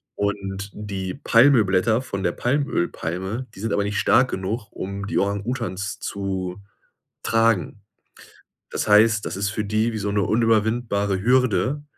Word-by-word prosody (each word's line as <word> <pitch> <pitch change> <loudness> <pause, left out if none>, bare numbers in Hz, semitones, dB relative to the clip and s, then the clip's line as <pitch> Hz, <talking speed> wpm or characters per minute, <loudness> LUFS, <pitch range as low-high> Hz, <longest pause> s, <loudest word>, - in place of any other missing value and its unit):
Und 100 -1 -3
die 95 -3 -5
Palmölblätter 115 -5 +4
von 100 -7 -5
der 90 - +1
Palmölpalme, 110 - -2
die - - -13
sind 110 0 -3
aber 100 - +1
nicht 105 0 -2
stark 130 +1 +3
genug, 100 +3 -3
um 100 +1 -5
die - - -1
Orang-Utans 100 0 -2
zu 95 -1 -4 0.6
tragen. 115 -3 +1 0.9
Das - - -3
heißt, 110 +1 +5
das - - -4
ist 100 +1 -1
für 105 0 -3
die 110 +3 +1
wie 110 - -4
so 100 0 -2
'ne 100 0 +1
unüberwindbare 110 -3 +1
Hürde. 130 +4 +2
105 Hz, 140 wpm, -23 LUFS, 100-115 Hz, 0.9 s, heißt